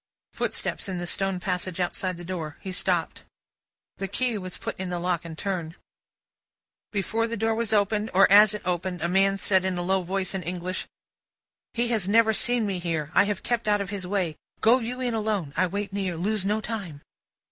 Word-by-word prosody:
Footsteps - - 0
in 185 - -3
the 175 - -3
stone 195 +1 0
passage 180 -1 -2
outside 180 0 -1
the 175 - -8
door. 165 -5 -5
He 190 - -5
stopped. 180 -2 -1 0.7
The 195 - -3
key 245 +4 0
was 185 -1 -6
put - - -4
in 185 -1 -3
the 175 - -2
lock, 175 -1 -1
and 165 -2 -8
turned. 175 -4 -3 1.2
Before 220 +3 0
the 230 0 -3
door 225 +2 +1
was 225 -1 -1
opened, 210 +1 +2
or 195 +2 +6
as 210 +1 +8
it 210 - -7
opened, 180 -1 -2
a - - +2
man 195 +2 +3
said 190 -1 +3
in 190 -1 -1
a 175 - -2
low 190 +1 +2
voice, 185 +1 -2
in 190 - -2
English: 180 +2 -4 0.9
"He 235 0 +1
has 215 -5 0
never 220 +1 +5
seen 240 +1 +2
me 195 -3 -2
here; 160 -4 -2
I - - +6
have 205 -1 -2
kept 235 -2 -1
out 205 0 +3
of 200 -1 -4
his 195 -3 -4
way. 180 -5 -1 0.2
Go 235 +4 +5
you 250 +2 -4
in 245 -2 0
alone; 210 -9 -1
I 185 - +3
wait 200 +2 -4
near. 190 -4 -2
Lose 200 +2 0
no 210 +1 +1
time!" 195 -11 -5
190 Hz, 205 wpm, -26 LUFS, 180-210 Hz, 1.2 s, as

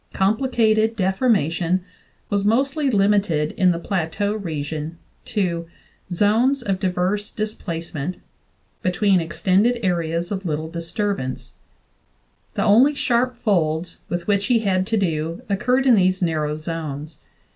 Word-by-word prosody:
Complicated 220 +1 +2
deformation 185 - +1 0.5
was 200 -1 +1
mostly 270 +7 +2
limited 195 -8 +2
in 185 - +3
the 170 - +1
Plateau 190 +3 -1
region 160 -4 -4 0.3
to 170 -5 -1 0.4
"zones 230 +9 +2
of 195 -4 -1
diverse 190 +3 -1
displacement" 170 -6 -4 0.6
between 185 0 +2
ex 165 -1 -7
tended 210 +6 +3
areas 170 -1 -1
of 195 -1 -3
little 160 -2 -3
disturbance; 170 - -3 1.0
the - - +1
only 255 +8 +5
sharp 250 -1 +1
folds 175 -7 0
with, 175 0 -3
which 200 -1 +1
he 235 -3 +3
had 190 -3 +1
to 225 0 +1
do 165 +1 -1
occurred 250 +6 +1
in 255 - +6
these 185 -3 +3
narrow 155 -4 0
zones. 155 -1 -6
190 Hz, 125 wpm, -22 LUFS, 165-215 Hz, 1.0 s, in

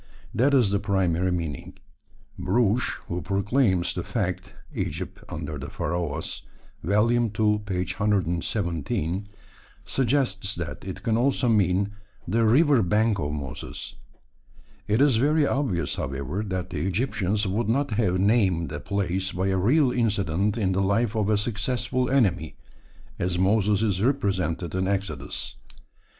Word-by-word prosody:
That 140 +4 +3
is 120 -7 +4
the 100 - +2
primary 95 -3 +1
meaning. 80 -5 -4 0.6
Brugsch, 105 +5 +1
who 90 +1 -3
proclaims 100 -1 +1
the - - -3
fact - - -3 0.2
(Egypt - - -4
Under 75 -2 -5
the 70 +2 -6
Pharaohs, 85 -3 -3 0.4
ii. - - -4 0.5
117), 95 - 0 0.6
suggests 120 -7 0
that 85 -1 -5
it 95 -1 -7
can 110 -1 +1
also 130 +1 +2
mean 100 -2 +2 0.4
"the 115 +5 +2
river 140 +2 +5
bank 105 +3 +2
of 75 - -2
Moses." 70 -3 -6 0.9
It 110 +5 +2
is 140 -5 +5
very 150 +5 +3
obvious, 130 - -1
however, 70 +8 -3
that 95 -1 -3
the 85 - -3
Egyptians 105 0 0
would 105 +3 -1
not 135 +3 +1
have 105 -4 +1
named 95 - +2
a 75 - -4
place 95 0 -1
by 95 +2 -1
a 95 - +1
real 130 - +3
incident 105 -3 0
in 100 -4 +1
the 95 +1 +1
life 100 +3 +1
of 105 -2 +1
a 105 - +3
successful 120 +3 -1
enemy, 100 - +1 0.6
as 90 0 0
Moses 100 +2 +2
is 100 -4 0
represented 95 - 0
in 95 0 0
Exodus. 95 -8 -3
100 Hz, 135 wpm, -25 LUFS, 90-115 Hz, 0.9 s, river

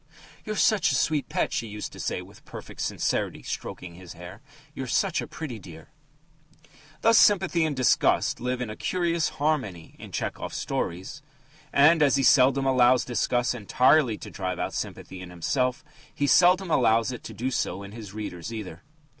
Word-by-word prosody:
"'You're 215 - -3
such 210 -1 +3
a - - +1
sweet 150 -5 0
pet!' - - -1
she 115 - -2
used 105 0 -6
to - - -12
say - - -3
with - - -17
perfect - - -9
sincerity, - - -2
stroking 90 -1 -6
his 90 0 -11
hair. 90 +5 -11 0.3
'You're 135 -2 -5
such 190 +7 +1
a - - -6
pretty 135 -8 -7
dear!'" 80 -4 -13 1.1
Thus 230 0 +6
sympathy 185 -5 +4
and 150 -2 -2
disgust 130 -1 +2
live 125 +1 -2
in 120 -3 -3
a - - -7
curious 170 0 0
harmony 130 - -2
in - - -10
Tchehov's - - -4
stories. 95 - -4 0.5
And, 155 +3 +5
as 140 -3 +4
he 135 - +1
seldom 135 +1 +5
allows 125 -1 +4
disgust 120 +1 0
entirely 125 +2 +3
to - - -10
drive 90 -2 -4
out - - -3
sympathy 95 0 -6
in 90 - -9
himself, 125 - -1 0.3
he 145 - -1
seldom 180 +5 +4
allows 115 -3 +3
it 125 - -8
to - - -7
do 130 +3 -2
so 100 -5 -2
in 100 - -10
his 110 -3 -9
readers 105 -2 -6
either. 100 -6 -7
125 Hz, 175 wpm, -26 LUFS, 100-150 Hz, 1.1 s, Thus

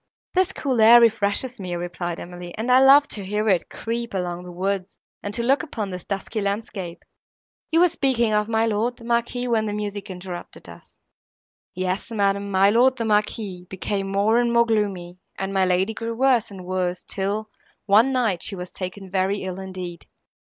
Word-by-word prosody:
"This 370 0 +2
cool 260 -10 -1
air 230 +2 +9
refreshes 230 +2 +1
me," 180 -2 -4
replied 175 0 -4
Emily, 175 +1 -9
"and 230 +3 -1
I 255 - +7
love 275 +2 +7
to 205 - -5
hear 210 +3 -1
it 180 -4 +1
creep 230 -1 -4
along 175 -1 -2
the 180 - -8
woods, 190 +1 -3 0.2
and 205 - -4
to 235 - -1
look 270 +4 +3
upon 215 - -5
this 180 -1 -7
dusky 205 +2 -3
landscape. 200 -3 -4 0.6
You 330 +1 +3
were 360 - +7
speaking 260 -9 +1
of 210 +1 +1
my 225 0 +2
lord, 225 +3 0
the 235 - -14
Marquis, 235 +1 -1
when 220 -2 +1
the 205 - -2
music 205 -1 -4
interrupted 180 -1 -8
us." - - -15 0.8
"Yes, 185 +3 -2
madam, 200 -2 0
my 195 +1 +4
lord, 250 +4 +4
the 230 - -2
Marquis, 210 -4 -1
became 195 +1 -3
more 210 +4 +3
and 240 -1 +1
more 235 0 +4
gloomy; 195 -5 -2 0.2
and 195 0 -3
my 190 -1 +3
lady 185 +4 +1
grew 230 +1 -4
worse 255 -2 +3
and 190 -3 -10
worse, 180 -1 -2
till, 205 +3 -3 0.4
one 220 +6 +5
night, 225 -9 +1
she 200 - -1
was 180 -1 -7
taken 190 +1 -6
very 195 +1 0
ill, 185 0 -5
indeed. 185 -3 -7
205 Hz, 190 wpm, -23 LUFS, 185-230 Hz, 0.8 s, air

